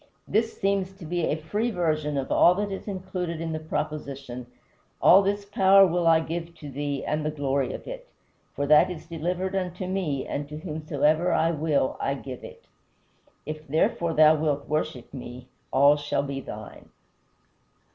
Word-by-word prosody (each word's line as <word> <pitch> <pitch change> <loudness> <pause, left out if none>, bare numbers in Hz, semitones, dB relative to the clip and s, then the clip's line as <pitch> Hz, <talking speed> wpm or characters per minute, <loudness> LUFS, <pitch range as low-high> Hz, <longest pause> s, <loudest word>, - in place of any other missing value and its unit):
This 225 +1 0
seems 195 -1 0
to 190 -3 -11
be 170 +1 -1
a - - 0
free 205 +9 -2
version 155 -7 -1
of 135 - -3
all 175 - +6
that 205 +1 -2
is 195 - -6
included 185 -4 -4
in 165 0 -3
the 155 - -3
proposition: 140 -5 -5 0.5
"All 190 - +7
this 200 +1 -1
power 195 -1 +6
will 175 -1 +1
I 165 -1 +6
give 170 +1 -5
thee, 145 -1 -4
and 150 0 -1
the 155 - 0
glory 140 -3 -1
of - - -7
it; - - -8 0.5
for 145 - -1
that 150 +4 +6
is 180 -3 -7
delivered 175 +3 -3
unto 185 -1 -3
me 180 -8 -2
and 145 0 -4
to 150 - -6
whomsoever 155 +1 0
I 165 +1 +2
will 150 -4 0
I 135 - -1
give 130 -2 -8
it. - - -12 0.8
If, 155 +1 -7
therefore, 170 +3 +1
thou 155 0 +7
wilt 150 -2 -1
worship 150 -5 -3
me 125 -1 -9 0.2
all 140 +2 +5
shall 145 -1 -1
be 140 -1 -4
thine." 105 -4 -10
155 Hz, 170 wpm, -26 LUFS, 145-185 Hz, 0.8 s, All